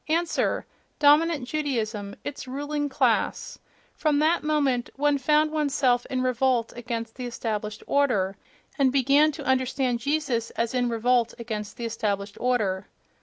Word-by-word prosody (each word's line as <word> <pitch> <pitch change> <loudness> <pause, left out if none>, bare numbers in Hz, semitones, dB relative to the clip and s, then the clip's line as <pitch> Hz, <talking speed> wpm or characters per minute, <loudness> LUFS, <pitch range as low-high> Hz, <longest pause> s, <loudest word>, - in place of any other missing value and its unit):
Answer: 330 +1 0 0.3
dominant 295 -2 +4
Judaism, 225 -9 -2
its 285 -2 -6
ruling 290 +2 -3
class. 265 - 0 0.3
From 300 -2 +1
that 315 +3 +3
moment, 280 -5 +1
one 290 0 +2
found 305 +3 +3
one's 300 -2 -1
self 245 -4 +2
in 255 -1 -1
revolt 255 -2 +1
against 230 -1 -4
the 250 -1 -4
established 215 -3 -4
order, 210 -10 +1 0.4
and 270 -2 +4
began 280 +3 +4
to - - -8
understand 260 -1 +1
Jesus 275 -3 -1
as 230 +1 0
in 245 -1 +1
revolt 235 0 +1
against 215 -3 -5
the 235 - -4
established 205 -3 -2
order. 210 -7 0
255 Hz, 140 wpm, -26 LUFS, 230-290 Hz, 0.4 s, dominant